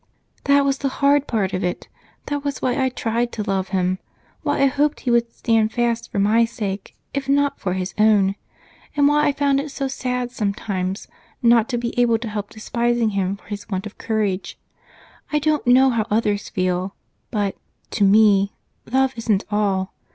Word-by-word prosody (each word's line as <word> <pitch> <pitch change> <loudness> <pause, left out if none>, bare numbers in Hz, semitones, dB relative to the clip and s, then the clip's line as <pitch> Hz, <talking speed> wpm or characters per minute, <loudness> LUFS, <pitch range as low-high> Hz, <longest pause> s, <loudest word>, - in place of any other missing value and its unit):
"That 280 0 +4
was 275 -1 +1
the 280 - 0
hard 285 0 +3
part 200 -5 -1
of 185 +1 -1
it! 180 -1 -3 0.4
That 290 -1 -3
was 285 -2 -3
why 250 -1 0
I 260 - +2
tried 235 -1 -1
to 215 - -3
love 195 -2 -1
him, 185 0 0 0.4
why - - 0
I - - +6
hoped 285 +2 +1
he 245 - 0
would 235 0 +2
stand 225 -2 +1
fast 235 -1 -1
for - - -4
my 210 +4 +4
sake, 210 -4 -4 0.2
if 275 -1 -3
not 285 0 +2
for 180 - -2
his 185 -1 -3
own, 210 -3 +4 0.6
and 285 -1 +4
why 295 +1 +3
I - - +4
found 280 -1 +1
it 290 +2 -4
so 275 0 -3
sad 250 -2 -3
sometimes 200 -3 -3 0.4
not 235 0 +5
to 245 - -1
be 235 0 -3
able 235 -2 +4
to 225 0 -5
help 210 -1 -4
despising 235 +1 0
him 195 0 -1
for - - -24
his 205 -1 -6
want 190 0 -3
of 210 - -10
courage. 210 -4 -2 0.7
I 300 - +2
don't 300 -2 0
know 260 +2 +6
how 225 -2 0
others 210 -1 0
feel, 185 +1 -1 0.3
but, 205 -3 -1 0.4
to 205 - +1
me, 200 -1 +5 0.4
love 265 0 +2
isn't 220 -3 +1
all. 195 -2 0
225 Hz, 190 wpm, -21 LUFS, 200-260 Hz, 0.7 s, I